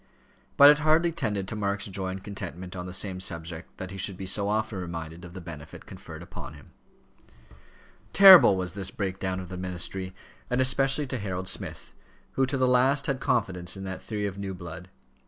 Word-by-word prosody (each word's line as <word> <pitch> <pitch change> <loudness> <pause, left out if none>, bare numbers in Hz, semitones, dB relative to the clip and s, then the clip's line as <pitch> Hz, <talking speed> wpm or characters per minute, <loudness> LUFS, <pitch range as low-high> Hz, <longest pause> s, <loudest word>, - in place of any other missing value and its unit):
But 140 +1 +10
it 150 - +2
hardly 160 +3 +3
tended 105 - -2
to 110 - -5
Mark's 100 -1 -2
joy 95 -1 -3
and 95 +1 -5
contentment 95 -3 -7
on 90 0 -5
the - - -6
same 95 -1 -2
subject 85 -2 -5
that 95 0 -7
he 95 - -7
should 95 -1 -1
be 95 - -6
so 100 +2 +1
often 110 -1 -1
reminded 85 -1 -6
of 90 0 -11
the 95 - -7
benefit 80 -4 -10
conferred - - -10
upon 75 - -9
him. 70 - -16 1.4
Terrible 190 - +9
was 90 -2 -3
this 95 -2 -3
break 95 -1 -4
down 95 -1 -2
of 90 -2 -8
the 90 - -6
ministry, 95 +1 -4 0.3
and 125 - 0
especially 135 +2 +2
to 130 -2 -4
Harold 95 -2 -4
Smith, 95 - -6 0.4
who 135 0 +1
to 135 +1 -1
the 130 -1 +2
last 130 +3 +3
had 140 -2 0
had - - -19
confidence 95 -8 -1
in 95 - -7
that 95 -1 -6
theory 105 -2 -4
of 100 -1 -4
new 95 -1 -4
blood. 90 +1 -9
95 Hz, 205 wpm, -27 LUFS, 90-125 Hz, 1.4 s, But